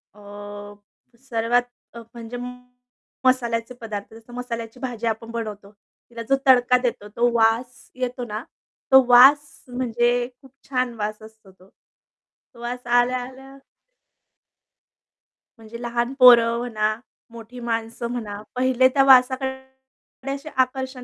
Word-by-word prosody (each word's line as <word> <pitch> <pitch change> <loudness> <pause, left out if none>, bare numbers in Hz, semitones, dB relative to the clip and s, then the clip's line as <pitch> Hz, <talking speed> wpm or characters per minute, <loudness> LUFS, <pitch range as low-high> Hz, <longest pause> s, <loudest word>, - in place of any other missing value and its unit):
अ, 210 - -17 1.0
सर्वात 240 -1 0 0.3
अ, 235 - -9
म्हणजे 235 0 -8 0.9
मसाल्याचे 240 -2 +1
पदार्थ. 210 -2 -7
जसं 225 +2 -15
मसाल्याची 235 -1 -6
भाजी 240 -3 -4
आपण 225 +1 -3
बनवतो, 210 -3 -6 0.4
तिला 235 -1 -8
जो 275 - +5
तडका 250 -1 +5
देतो, 245 -4 -3
तो 240 +1 +3
वास 230 +2 0
येतो 250 -1 -4
ना, 215 0 -6 0.5
तो 265 0 +8
वास 270 +4 +6
म्हणजे 240 -1 0 0.3
खूप 270 -2 -18 0.2
छान 255 -2 -1
वास 210 +1 -4
असतो 220 -2 -16
तो. 190 0 -23
तो 235 - -26
वास 245 0 -6
आल्या-आल्या 255 +2 -1 2.0
म्हणजे 225 +1 -11
लहान 240 +1 -2
पोरं 235 -2 +7
म्हणा, 215 -3 -1 0.4
मोठी 235 +2 -11
माणसं 230 0 -3
म्हणा, 210 -4 -5
पहिले 255 0 +3
त्या 275 - +4
वासाकडे, 260 0 +5 0.7
थोडेसे 275 +3 -5
आकर्षण 260 0 -1
240 Hz, 120 wpm, -22 LUFS, 225-255 Hz, 2.0 s, तो